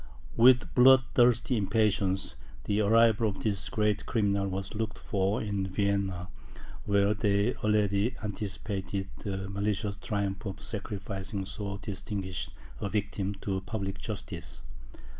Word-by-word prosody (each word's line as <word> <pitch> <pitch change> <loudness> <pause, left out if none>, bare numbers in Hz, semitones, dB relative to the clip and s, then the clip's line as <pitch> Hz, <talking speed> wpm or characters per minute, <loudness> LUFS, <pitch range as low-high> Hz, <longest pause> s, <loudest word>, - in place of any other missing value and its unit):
With 125 +1 +6
blood 130 +1 +7
thirsty 120 0 +4
impatience, 100 -2 +1 0.3
the 105 +7 +1
arrival 115 +1 +4
of 100 - -6
this 100 -3 -1
great 105 -1 0
criminal 100 -3 +1
was 95 +2 -4
looked 110 0 -3
for 100 +1 0
in 100 -2 -1
Vienna, 95 -2 0 0.6
where 100 0 +3
they 105 +2 +2
already 105 +2 +1
anticipated 100 -1 -4
the 95 -1 -4
malicious 100 +1 -1
triumph 100 -2 -2
of 95 - -5
sacrificing 100 -1 -4
so 100 0 -5
distinguished 95 -2 -4 0.3
a 100 - -2
victim 100 -1 -2
to 95 -2 -2
public 95 -1 -4
justice. - - -6
100 Hz, 120 wpm, -29 LUFS, 95-110 Hz, 0.6 s, blood